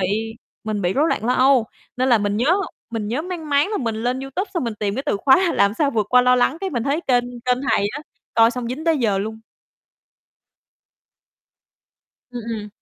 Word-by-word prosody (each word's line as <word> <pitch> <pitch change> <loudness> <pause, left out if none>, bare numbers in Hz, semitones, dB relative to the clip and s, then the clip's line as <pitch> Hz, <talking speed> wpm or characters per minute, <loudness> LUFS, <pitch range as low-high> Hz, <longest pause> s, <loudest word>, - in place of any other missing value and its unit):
bị 220 +4 -1 0.3
mình 210 -2 -2
bị 175 +1 +1
rối 300 +7 +2
loạn 215 - -1
lo 250 - +2
âu, 255 -3 +4 0.3
nên 255 +1 +1
là 235 - +5
mình 205 0 -1
nhớ 270 +10 +3 0.4
mình 220 -3 -3
nhớ 255 +7 -2
mang 340 -3 -6
máng 285 +4 +3
là 420 - -1
mình 230 -3 -2
lên 245 +3 -2
YouTube, 355 +9 -4
xong 340 -8 -1
mình 230 -2 -3
tìm 205 -1 -2
cái 270 - -3
từ - - +1
khóa 310 - +4
"Làm 200 +1 +2
sao 285 0 +1
vượt 215 -4 0
qua 250 0 +6
lo 250 0 +4
lắng?" 250 +5 +2
Cái 385 - -3
mình 240 -5 -2
thấy 285 +5 0
kênh 245 -6 +1 0.2
kênh 250 0 +2
thầy 200 - +2
á, 290 - -5 0.3
coi 225 0 +5
xong 245 -1 -5
dính 275 +7 -5
tới 325 -3 +2
giờ 210 -5 +1
luôn. 220 +2 -5 2.9
Ừm, 240 -2 -6
ừm. 210 -2 -5
245 Hz, 215 wpm, -21 LUFS, 220-280 Hz, 2.9 s, qua